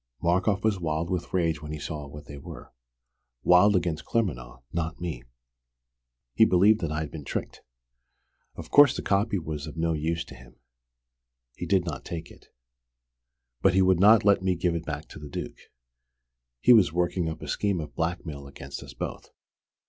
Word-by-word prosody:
Markoff 95 +5 +1
was 110 -3 +1
wild 80 0 -2
with 90 - -3
rage 80 -4 0
when 75 -1 -7
he 75 - -4
saw 75 0 -6
what 75 +1 -11
they 70 0 -9
were - - -11 0.7
wild 95 +4 +6
against 85 -3 -1
Claremanagh, 60 - -2
not 85 0 -3
me. 85 -9 -4 1.1
He - - +5
believed 105 +2 +5
that 80 -3 -2
I'd 75 -1 -3
been 80 -3 -7
tricked. - - -5 0.9
Of - - -9
course 145 -2 +7
the - - -4
copy 100 +1 +1
was 80 -3 -5
of 75 - -9
no 80 0 +1
use 80 +2 -2
to - - -12
him. 65 -1 -15 1.0
He - - -6
did 95 -3 +2
not 75 -6 -5
take 85 -1 -7
it. - - -18 1.1
But 95 -1 +4
he 95 - +5
would 95 -2 +3
not 105 +2 +6
let 100 -2 +5
me 95 -1 +1
give 85 0 0
it 85 0 -4
back 75 0 -5
to - - -10
the 75 -1 -9
Duke. - - -7 0.9
He 125 - +6
was 100 -8 +5
working 85 0 0
up 80 - -7
a - - -7
scheme 100 -4 0
of 75 - -7
blackmail 80 -4 -4
against 70 0 -9
us - - -11
both. - - -6
85 Hz, 180 wpm, -27 LUFS, 75-95 Hz, 1.1 s, course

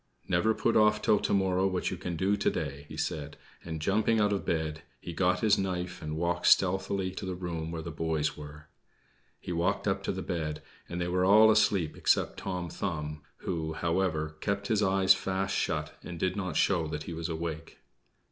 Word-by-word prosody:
"Never 110 0 +2
put 115 - +1
off 105 0 +5
till 105 -2 +4
to - - -2
morrow 95 -1 +2
what 95 -1 -1
you - - -2
can 90 -1 -4
do 95 +5 +2
to 100 - +1
day," 70 +1 -4
he - - -8
said; 75 -1 -3 0.3
and, 80 -2 -5
jumping 110 +6 +2
out 105 -1 +3
of 100 - -2
bed, 80 -1 -2 0.2
he 85 - -7
got 90 +1 +1
his 105 -2 +4
knife 90 -2 -3
and 75 0 -4
walked 90 +1 0
stealthily 95 0 +3
to - - -7
the 95 -1 -3
room 85 -3 -4
where 80 -1 -5
the 85 - -5
boys 80 -1 -1
were. 75 +1 -10 0.7
He - - -6
walked 90 +5 0
up 95 -1 +1
to - - 0
the 95 -1 -4
bed, 75 -4 -3 0.3
and 85 - -4
they 85 - -1
were 90 +1 +1
all 110 +3 +7
asleep 100 -7 +2
except - - +1
Tom 90 -2 -3
Thumb, 75 -4 -4 0.2
who, 80 -3 -2
however, 80 -2 -1
kept 100 0 -2
his 110 -2 +2
eyes 95 -1 +5
fast 95 0 -2
shut, 75 -1 -1
and 85 -1 -8
did 95 +1 0
not 95 -5 -2
show 85 -5 +2
that 75 -1 -4
he 85 - -6
was 80 +1 -4
awake. 80 0 -5
90 Hz, 205 wpm, -29 LUFS, 80-95 Hz, 0.7 s, all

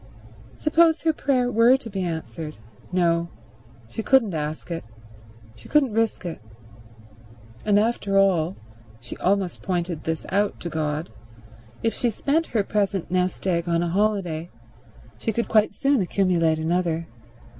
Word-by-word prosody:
Suppose 320 +1 +3
her 320 -1 +3
prayer 255 -4 +1
were 235 +3 +5
to 255 - -11
be 195 -3 -4
answered? 160 -2 -4 0.4
No; 170 -2 +2 0.6
she 170 - -5
couldn't 230 -5 +3
ask 155 +2 -4
it; 165 - -3 0.7
she - - -15
couldn't 275 -7 +3
risk 225 -3 0
it. 170 - -5 1.3
And 205 -1 +4
after 205 -2 +1
all—she 120 - -1
almost 190 -1 0
pointed 175 -4 -2
this 160 0 -2
out 205 +2 0
to 170 - -4
God—if 120 - -5
she 245 - 0
spent 295 +9 0
her 215 -4 0
present 195 -4 -1
nest 185 +1 0
egg 170 -2 0
on 170 0 +2
a 170 - -1
holiday 180 -4 0 0.7
she 225 - -1
could 235 +2 -1
quite 215 -1 +3
soon 275 -4 +2
accumulate 175 -4 +2
another. 165 0 0
185 Hz, 135 wpm, -24 LUFS, 160-220 Hz, 1.3 s, were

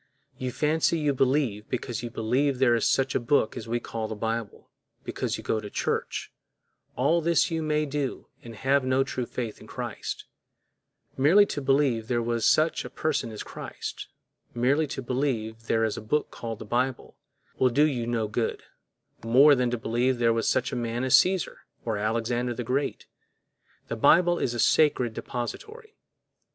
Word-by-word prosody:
You 130 -1 -3
fancy 155 +4 +1
you 150 -2 +1
believe 130 -5 0
because 120 -2 -3
you 120 - -5
believe 125 +5 0
there 125 -2 +4
is 115 - +2
such 135 0 +1
a - - +1
book 120 -1 +1
as 110 - -7
we 120 +1 -1
call 115 -2 -5
the 110 - -5
Bible, 115 0 -4 0.4
because - - -3
you - - -9
go 110 - 0
to 105 -1 -7
church—all 150 +9 -3
this 170 +2 +2
you 165 -1 -1
may 155 0 0
do 145 -2 -3 0.2
and 115 -1 -10
have 135 +4 +2
no 130 +1 +2
true 130 -3 -4
faith 115 -4 -5
in - - -13
Christ; - - -5 0.9
merely 165 +10 +6
to 145 - -4
believe 135 -5 +2
there 120 0 +1
was 115 -1 0
such 155 +1 +3
a - - -7
person 145 -7 -2
as 105 - -6
Christ, - - -7 0.5
merely 140 +6 +2
to 135 -1 -5
believe 115 -4 -2
there 115 0 +2
is 110 - -2
a - - -5
book 150 +8 -1
called 115 -2 -6
the 110 - -9
Bible, 125 +3 -2 0.4
will 130 - +4
do 145 +5 +4
you 125 -6 -1
no 115 -2 0
good, 110 +2 -2 0.6
more 130 +6 +6
than 125 -2 +1
to 120 - -1
believe 120 +3 0
there 115 -1 +3
was 115 0 0
such 125 - 0
a - - -3
man 120 0 -2
as 130 - 0
Cæsar 185 -1 +4 0.3
or 110 -3 -1
Alexander 115 +3 -1
the 125 - -4
Great. 130 +4 -2 0.8
The - - -3
Bible 170 +8 +4
is 120 - -1
a - - -4
sacred 125 -4 +3
depository. 430 - -6
125 Hz, 180 wpm, -27 LUFS, 115-145 Hz, 0.9 s, merely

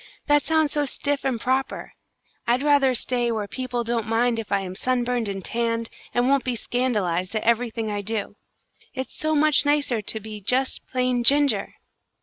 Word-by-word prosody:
That 290 0 +4
sounds 315 -1 +2
so 295 -1 +1
stiff 285 +2 -2
and 260 -4 -1
proper. 260 +3 -2 0.5
I'd 245 +3 +2
rather 285 -3 +4
stay 240 0 0
where 215 -3 -2
people 250 0 -3
don't 230 -1 -2
mind 230 +1 +1
if 220 - -7
I 200 -1 +2
am 185 -1 -6
sunburned 245 -1 0
and 195 -2 -5
tanned, 230 -1 -1 0.2
and 245 +1 +1
won't 275 0 +3
be 250 -1 -1
scandalised 210 -7 -1
at 215 - -1
everything 230 -1 0
I 205 0 -2
do. 205 0 -3 0.6
It's 260 0 -5
so 310 0 0
much 305 -1 +4
nicer 285 -6 +1
to 220 +2 -1
be 215 0 -8
just 255 +7 0
plain 250 -1 0
Ginger!" 275 -4 +3
245 Hz, 175 wpm, -24 LUFS, 220-265 Hz, 0.6 s, That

